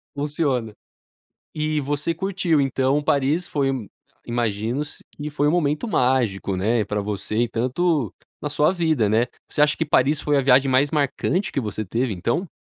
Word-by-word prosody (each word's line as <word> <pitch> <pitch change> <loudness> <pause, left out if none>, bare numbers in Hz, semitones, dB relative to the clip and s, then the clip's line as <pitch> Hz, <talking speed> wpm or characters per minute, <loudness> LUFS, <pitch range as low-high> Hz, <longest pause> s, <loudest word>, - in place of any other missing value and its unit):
Funciona. 140 -6 -1 0.8
E 155 0 -1
você 145 +4 -1
curtiu 180 -3 0
então 135 +1 +1
Paris, 145 +5 +1
foi 135 -2 0 0.5
imagino 120 +4 -2 0.2
que 150 +1 -5
foi 145 0 0
um - - +3
momento 155 +3 0
mágico, 125 - +1
né, 110 +4 +1
pra 105 +1 -2
você 105 +1 -3
e 120 - 0
tanto 130 - 0 0.3
na 150 - -3
sua 150 +3 +3
vida, 160 - +1
né. 115 +3 +2 0.2
Você - - 0
acha 150 0 +4
que 160 - 0
Paris 145 +1 +3
foi 145 -1 +1
a - - +3
viagem 135 +1 +4
mais 135 +2 +3
marcante 155 +6 0
que - - -1
você 110 -2 -3
teve 115 +4 -1
então? 120 - -1
140 Hz, 165 wpm, -23 LUFS, 120-150 Hz, 0.8 s, acha